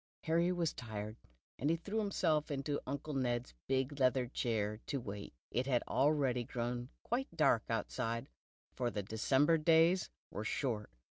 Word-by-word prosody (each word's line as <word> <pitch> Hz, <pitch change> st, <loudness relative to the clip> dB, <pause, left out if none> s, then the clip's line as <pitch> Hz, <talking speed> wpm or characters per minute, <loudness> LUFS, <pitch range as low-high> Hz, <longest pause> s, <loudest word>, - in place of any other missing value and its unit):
Hany" 170 Hz, +2 st, +3 dB
was 175 Hz, -3 st, 0 dB
tired, 110 Hz, -2 st, -5 dB, 0.4 s
and 160 Hz, +4 st, +2 dB
threw 210 Hz, +4 st, -1 dB
himself 170 Hz, -7 st, +1 dB
into 145 Hz, 0 st, -1 dB
Uncle 140 Hz, +3 st, -3 dB
Xed's 125 Hz, -, -1 dB, 0.2 s
bicj 135 Hz, +2 st, 0 dB
leather 130 Hz, -1 st, +3 dB
chair 110 Hz, -4 st, -1 dB
to 140 Hz, -, -1 dB
wait. 100 Hz, -4 st, -6 dB, 0.2 s
It 125 Hz, +2 st, 0 dB
had 125 Hz, -3 st, +2 dB
already 135 Hz, -3 st, +2 dB
grown 120 Hz, 0 st, -3 dB
quite 255 Hz, +3 st, 0 dB
dark 135 Hz, -8 st, +5 dB
outside, 115 Hz, 0 st, -1 dB, 0.5 s
for 120 Hz, -1 st, 0 dB
the 105 Hz, -3 st, -3 dB
December 135 Hz, -, +3 dB
days 165 Hz, +3 st, +5 dB, 0.2 s
were 105 Hz, -, -3 dB
short. 110 Hz, -3 st, -1 dB
130 Hz, 145 wpm, -36 LUFS, 115-155 Hz, 0.5 s, dark